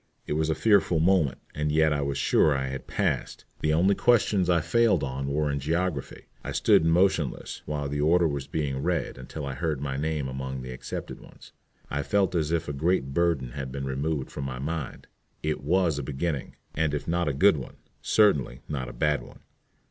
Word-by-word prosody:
It - - -2
was 80 +1 0
a 80 - +1
fearful 100 -6 +3
moment, 85 -4 +3 0.2
and 75 0 -1
yet 80 0 +3
I 70 - -1
was 70 -1 -2
sure 75 - +3
I 65 0 -2
had 65 0 -6
"passed." - - -2
The 75 - +1
only 90 +5 +4
questions 105 -6 +3
I 85 -1 +4
failed 95 +1 +2
on 70 0 -3
were 75 +1 0
in 70 - -1
geography. 80 0 -2 0.2
I - - -4
stood - - +4
motionless 80 -3 +1
while 75 -1 -2
the 75 +1 -2
order 85 +3 +4
was 70 -3 -3
being 70 -4 -2
read 85 -5 -1
until 70 +3 -6
I 70 - -4
heard 75 +1 -2
my 70 -1 -3
name 75 -1 -1
among 65 0 -5
the 65 - -6
accepted 60 - -6
ones. - - -15 0.4
I 70 - 0
felt 95 +7 +1
as 80 -3 0
if 85 -1 0
a 75 - -3
great 70 -2 0
burden 80 -7 +1
had 70 -1 -5
been 70 +1 -4
removed 70 +1 -2
from 70 - -5
my 65 -1 -4
mind. 75 +1 -4 0.4
It 75 -1 -1
was 85 -1 +2
a - - -4
beginning, 70 +1 -3 0.2
and 75 -2 0
if 75 - -5
not 85 0 0
a - - +1
good 95 +4 +5
one, 65 - -8 0.3
certainly 70 - +2
not 65 -4 -4
a - - -9
bad 75 -3 +1
one. - - -14
75 Hz, 205 wpm, -27 LUFS, 70-85 Hz, 0.4 s, good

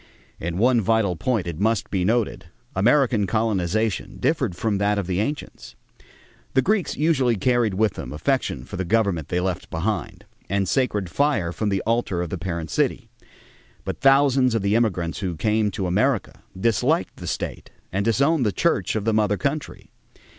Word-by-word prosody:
In 85 +1 -3
one 120 +2 +4
vital 110 -3 +1
point, 110 +2 -1
it 85 -2 -5
must 110 0 0
be 95 -3 0
noted, 115 +3 0 0.3
American 115 0 +3
colonization 110 -1 -1
differed 130 - 0
from 100 +1 -1
that 100 +1 +1
of 100 - -1
the 90 +1 -1
ancients. 110 - -4 0.8
The 130 - +4
Greeks 210 -2 0
usually 135 -6 +2
carried 115 -1 +1
with 105 0 +2
them - - -7
affection 80 - -1
for 90 - -7
the 95 - -1
government 95 -5 +1
they 90 - 0
left 90 0 -3
behind 100 +7 -3 0.2
and 100 0 0
sacred 105 -6 0
fire 140 - +1
from 105 +2 -1
the 95 -2 -1
altar 115 -5 0
of 85 - -6
the 95 - -3
parent 85 -3 -4
city; - - -1 0.7
but - - -5
thousands 135 -2 +4
of 110 - 0
the 100 +1 +1
immigrants 90 -9 0
who 95 -4 -3
came 110 +3 +1
to 95 -1 -3
America 105 +4 0 0.2
disliked 115 +1 +1
the - - -8
state - - -4 0.2
and 100 +2 0
disowned 140 +7 +2
the 105 - +2
church 105 - 0
of 110 -1 -2
the 115 - +2
mother 105 -1 +2
country. 140 +1 -4
105 Hz, 175 wpm, -23 LUFS, 95-120 Hz, 0.8 s, one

